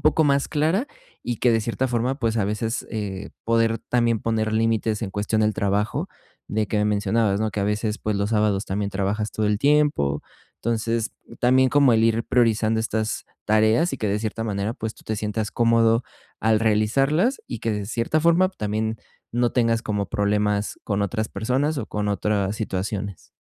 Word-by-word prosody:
poco 155 +2 +3
más 140 -1 +2
clara 160 - +1 0.4
y 120 -2 -2
que 125 - +3
de 115 - +2
cierta 120 +4 -1
forma, 125 +2 0
pues, 115 -1 0
a 100 - +2
veces, 110 +3 -2
eh, 105 -3 -4
poder 115 -1 +2
también 115 -3 +2
poner 110 -1 0
límites 110 0 +1
en 95 - -3
cuestión 105 +2 -1
del 105 0 +2
trabajo 100 +2 -1 0.4
de 105 0 -1
que 105 - 0
me 105 - +2
mencionabas, 105 0 +1
¿no?, 110 - 0
que 105 - -3
a - - +1
veces, 105 +1 -1
pues, 105 -1 -2
los 100 +2 -1
sábados 105 -2 +1
también 100 +1 -2
trabajas 100 +2 -1
todo 110 -1 0
el 105 -1 +1
tiempo. 145 - +2 0.4
Entonces 115 0 -1 0.3
también 130 +1 +4
como 140 -3 +4
el 110 0 +3
ir 115 0 +2
priorizando 110 -2 +2
estas 110 -1 -2 0.2
tareas 110 +10 +3
y - - -2
que 105 - -1
de 105 +1 0
cierta 115 +1 -3
manera, 105 +1 -2
pues, 110 0 -4
tú - - -19
te 110 - -2
sientas 105 +1 -2
cómodo 115 0 +3 0.4
al 110 -1 +3
realizarlas 135 - +2
y 115 - -6
que 115 - -1
de 105 -1 -3
cierta 115 +7 0
forma 170 +3 +4
también 110 - -2 0.3
no 120 0 +1
tengas 115 -2 +2
como 105 -2 -2
problemas 105 0 0
con 100 -1 -1
otras 110 +2 -2
personas 135 +6 -1
o 110 - -4
con 105 -1 -2
otras 100 0 0
situaciones. 100 -2 -4
110 Hz, 185 wpm, -23 LUFS, 105-115 Hz, 0.4 s, también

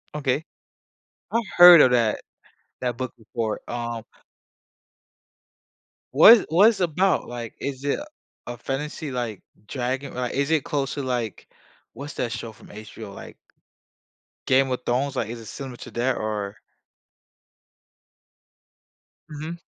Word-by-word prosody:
Okay, 145 +1 0 0.9
I 230 - +2 0.2
heard 175 -3 +11
of 125 - +5
that 115 -3 +1 0.6
that 125 -2 -2
book 130 -1 -4
before, 110 0 -4
um 120 -1 -4 2.1
What 215 - +8
what 190 +7 +6
it's 225 - -3
about, 180 +2 +1
like, 120 -2 -6
is 140 -1 -5
it 145 - 0 0.5
a 120 0 -6
fantasy, 145 +4 -4
like, 120 -5 -4 0.2
dragon 130 +2 -3
or, 125 - -4
like, 125 - -2
is 140 +2 0
it 155 -4 +2
close 140 -3 -2
to, 140 - -3
like, 120 -5 -3 0.5
what's 145 +2 -8
that 120 -2 -2
show 115 -1 -5
from 110 - -17
HBO, 105 0 -10
like - - -11 1.1
Game 135 0 +3
of 125 - -2
Thrones, 130 +3 0
like, 115 -4 -1
is 115 0 -7
it 110 - -12
similar 130 0 -7
to - - -10
that? 120 +3 0
or 105 -1 -3 2.7
Mhm. 155 +3 -7
130 Hz, 135 wpm, -24 LUFS, 120-145 Hz, 2.7 s, heard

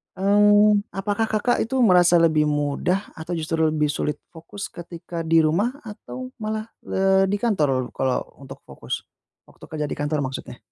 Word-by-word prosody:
Eee, 205 +2 +5 0.2
apakah 205 +3 -1
Kakak 220 +3 +1
itu 235 +4 -2
merasa 180 -4 +5
lebih 155 -2 +3
mudah, 150 +6 0
atau 160 +2 -5
justru 160 0 -2
lebih 150 -1 0
sulit 150 +1 -2 0.2
fokus, 170 +5 -8
ketika 170 0 -8
di 165 0 +4
rumah 200 - +1
atau 255 +4 -9
malah, 215 0 -3 0.2
eee, 190 0 +2
di 200 - 0
kantor 150 - 0
kalau 130 -1 -1 0.2
untuk 135 -1 -11
fokus? - - -6 0.5
Waktu - - -21
kerja 155 -1 -3
di - - -3
kantor 150 +1 -1
maksudnya. 130 -2 -6
175 Hz, 155 wpm, -23 LUFS, 155-205 Hz, 0.5 s, Eee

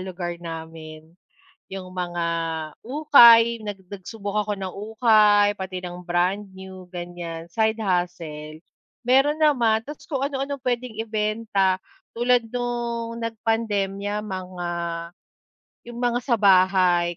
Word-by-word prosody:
lugar 180 -2 -5
namin. 160 -1 -8 0.7
Yung 185 -1 -7
mga 175 -2 -3 0.6
ukay, 240 -4 +8 0.2
nag 205 -2 -5
nagsubok 200 +1 -6
ako 210 0 -3
ng 190 -1 -4 0.2
ukay, 215 -3 +5
pati 190 -1 -5
ng 175 -1 -7
brand 180 +4 +1
new 190 0 -10 0.2
gan'yan, 175 -2 -6
side 220 0 +2
hustle. 170 -5 -3 0.5
Meron 270 +4 +4
naman 240 -8 +3
ta's 295 0 -9
kung 275 -3 -1
ano-ano 280 0 -3
puwedeng 245 -3 -3
ibenta. 215 -3 0 0.4
Tulad 245 0 +3
nung 235 -1 -3
nagpandemya, 210 -3 -1 0.2
mga 180 -1 -6 1.2
yung 240 0 -8
mga 240 0 +1
sa 235 - +4
bahay 185 -3 +4
205 Hz, 110 wpm, -24 LUFS, 180-235 Hz, 1.2 s, ukay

